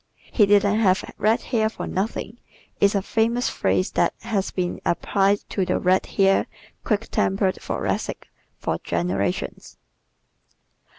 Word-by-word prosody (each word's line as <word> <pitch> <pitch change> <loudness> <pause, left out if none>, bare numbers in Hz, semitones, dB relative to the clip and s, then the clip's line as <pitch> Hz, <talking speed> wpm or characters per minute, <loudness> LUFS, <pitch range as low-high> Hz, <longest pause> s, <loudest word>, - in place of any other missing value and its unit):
"He 210 -4 +4
didn't 205 +1 +4
have 190 -4 +3
red 220 +4 +2
hair 220 -2 +1
for - - -6
nothing" 215 +4 -3 0.4
is 200 +1 +3
a 195 - +1
famous 230 +4 +1
phrase 185 - 0
that - - +1
has 210 -4 -1
been 180 -1 -3
applied 195 +3 +1
to 195 - 0
the 180 0 0
red 185 +1 +2
haired, 195 -1 +2 0.4
quick 215 +1 -1
tempered 190 -1 +1
Thoracic - - -3 0.3
for - - -2
generations. 90 +2 -2
200 Hz, 130 wpm, -23 LUFS, 185-220 Hz, 0.4 s, He